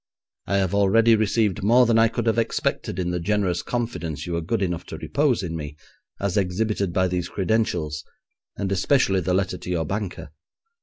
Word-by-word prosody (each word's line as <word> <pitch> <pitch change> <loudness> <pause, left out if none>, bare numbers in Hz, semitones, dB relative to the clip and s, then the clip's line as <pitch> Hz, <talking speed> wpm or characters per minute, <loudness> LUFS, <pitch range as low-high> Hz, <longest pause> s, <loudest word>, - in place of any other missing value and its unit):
I 100 - +1
have 95 -1 0
already 110 +3 +5
received 105 -2 +1
more 120 +5 +5
than 115 -1 +3
I 115 - +6
could 115 +1 -3
have 115 0 +2
expected 110 -5 -1
in 90 -1 -1
the 90 - -1
generous 90 -1 0
confidence 115 -11 -3
you 90 - -4
were 85 - -1
good 85 +4 -1
enough 85 -3 -2
to - - -6
repose 140 -8 0
in 85 -2 -4
me, 75 -2 -6 0.4
as 100 -1 -1
exhibited 100 0 0
by 95 +1 +2
these 90 -1 -2
credentials, 90 -8 -1 0.5
and 100 -1 -2
especially 100 0 +2
the 90 +1 0
letter 95 -1 -1
to - - -8
your 85 -3 0
banker. 90 -5 -4
95 Hz, 190 wpm, -24 LUFS, 90-110 Hz, 0.5 s, I